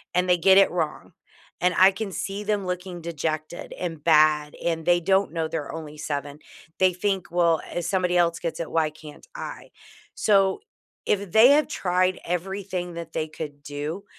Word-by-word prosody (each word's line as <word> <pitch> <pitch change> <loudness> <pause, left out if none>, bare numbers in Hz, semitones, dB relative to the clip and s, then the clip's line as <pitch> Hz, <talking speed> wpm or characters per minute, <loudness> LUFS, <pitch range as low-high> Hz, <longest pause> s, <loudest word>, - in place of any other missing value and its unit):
and 180 0 +2
they 180 - +5
get 190 +3 +5
it 195 - +6
wrong, 160 -4 -3 0.5
and 180 -1 +2
I 190 +1 +7
can 205 0 -5
see 200 +3 -4
them 205 -2 -1
looking 180 -1 -5
dejected 155 0 -4
and 165 -4 -5
bad 155 -2 +4
and 165 -1 0
they 175 +1 +3
don't 190 +1 +2
know 165 -1 -2
they're 160 -2 -4
only 155 -2 -8
7, 145 0 -5 0.4
they 185 -1 +5
think, 190 0 -2
well, 170 -2 +2
"If 175 -1 -3
somebody 180 -1 +1
else 170 -1 +2
gets 170 -1 -4
it, 165 - -5
why 160 -2 +2
can't 155 - -14
I?" - - -7 0.5
So 195 - +3 0.5
if 200 -3 -1
they 225 +4 +7
have 300 +1 +4
tried 185 0 0
everything 180 0 -3
that 165 -1 -7
they 160 -1 -2
could 145 -2 -8
do, 150 +7 -5
175 Hz, 180 wpm, -25 LUFS, 160-190 Hz, 0.5 s, I